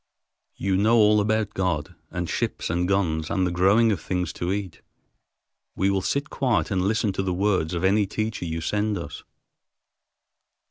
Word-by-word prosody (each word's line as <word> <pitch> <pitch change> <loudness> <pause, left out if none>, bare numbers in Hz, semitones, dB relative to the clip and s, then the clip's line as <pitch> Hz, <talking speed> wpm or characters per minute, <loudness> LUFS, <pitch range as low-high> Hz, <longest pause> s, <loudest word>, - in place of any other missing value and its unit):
You 95 0 0
know 110 +4 +4
all 105 -1 +5
about 110 0 0
God, 90 -2 -1 0.2
and 90 -1 -3
ships 80 - -2
and 90 +1 0
guns 80 -5 0
and 95 - +1
the 90 - -1
growing 100 +6 +4
of 95 -7 -2
things 90 -2 -2
to 85 +1 -3
eat. 95 -4 -4 0.9
We 95 +1 +1
will 95 -1 0
sit 140 +9 -2
quiet 125 -5 0
and 95 -2 +1
listen 105 +1 +1
to 95 - -1
the 95 -1 -1
words 95 -4 0
of 85 - -3
any 100 +2 +3
teacher 110 -2 -3
you 80 0 -3
send 105 +4 -1
us." 85 - -7
95 Hz, 175 wpm, -24 LUFS, 90-105 Hz, 0.9 s, all